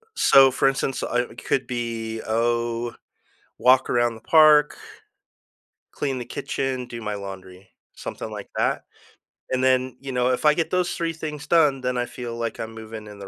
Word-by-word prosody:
so, 135 - +6
for 135 - +2
instance, 135 0 -1
I 120 - +1
it 120 - -9
could 130 - 0
be, 115 -2 -4
oh, 115 +1 0 0.7
walk 130 +1 +4
around 120 -1 +2
the 110 - -12
park, 150 0 +5 1.1
clean 135 -3 -2
the 120 - -6
kitchen, 130 -2 -3
do 120 -1 -7
my 105 -1 -3
laundry, 95 -1 -9 0.3
something - - -6
like - - -8
that, - - 0 0.7
and 130 0 0
then, 130 -1 +2
you 135 -1 -6
know, 125 0 +1
if 125 +3 -1
I 150 - +7
get 165 +2 -1
those 180 -1 0
3 165 -1 -2
things 150 -2 -6
done, 150 -6 +3
then 125 0 -1
I 120 - 0
feel 120 -1 -7
like 115 -1 -4
I'm 115 0 -5
moving 110 -1 -9
in 105 -1 -11
the 100 - -8
125 Hz, 180 wpm, -24 LUFS, 115-135 Hz, 1.1 s, I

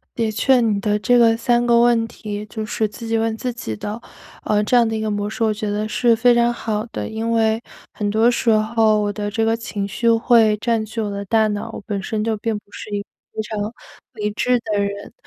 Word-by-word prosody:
的 225 -2 -1
确， 245 +3 +3
你 210 -3 +1
的 210 0 +1
这 245 +3 +3
个 225 -1 +5
3 240 +1 +2
个 235 -1 +5
问 235 -1 +3
题 210 -2 -6
就 215 +1 -5
是 215 0 -1
自 230 +2 -9
己 225 0 0
问 225 0 0
自 250 +2 -3
己 110 - -5
的， 210 - -5 0.4
呃， 210 0 +1
这 230 - 0
样 235 -2 +5
的 225 - -2
一 - - -3
个 215 0 -1
模 205 0 -2
式， 225 +2 -2
我 220 - +2
觉 210 0 -3
得 210 +1 -1
是 235 +1 +2
非 240 +2 +4
常 235 0 +3
好 220 -2 -3
的。 - - -5
因 225 +1 -3
为 225 -1 +2 0.3
很 210 - -2
多 220 +3 +3
时 235 0 -1
候， 215 0 +3
我 205 0 -1
的 205 0 -4
这 225 +1 0
个 225 0 +2
情 210 -3 -4
绪 230 +3 0
会 225 -2 +4
占 230 +1 0
据 220 +1 -4
我 210 - -2
的 200 0 -4
大 220 +1 +3
脑， 205 0 -4
我 - - -7
本 200 -3 -3
身 215 +2 -2
就 225 - 0
并 220 0 -2
不 - - -19
是 - - -8
一 205 -1 -2
个 - - -28 0.3
非 220 - -2
常 210 0 -4 0.4
理 210 0 -2
智 250 +4 +1
的 215 -3 -1
人。 200 0 -4
220 Hz, 265 characters per minute, -20 LUFS, 210-230 Hz, 0.4 s, 个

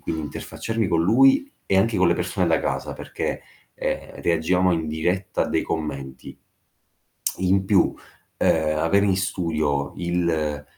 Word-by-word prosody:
quindi 80 -1 -3
interfacciarmi 110 +7 -3
con 85 -2 +2
lui 135 - +5 0.2
e 95 - +2
anche 110 +4 +2
con 90 -1 +4
le 85 - +3
persone 90 +1 -1
da 80 - +3
casa - - -2
perché, - - -4 0.3
ehm, - - -4
reagivamo 90 +2 +2
in 80 -2 -1
diretta 90 +5 -1
a - - -2
dei - - +1
commenti. 70 -4 -5 1.0
In 95 +1 +2
più, 95 -2 +3 0.4
ehm, 75 -1 +2
avere 100 +6 +3
in 95 -2 +2
studio 80 -6 -1
il 80 -4 -1
85 Hz, 145 wpm, -23 LUFS, 80-95 Hz, 1.0 s, lui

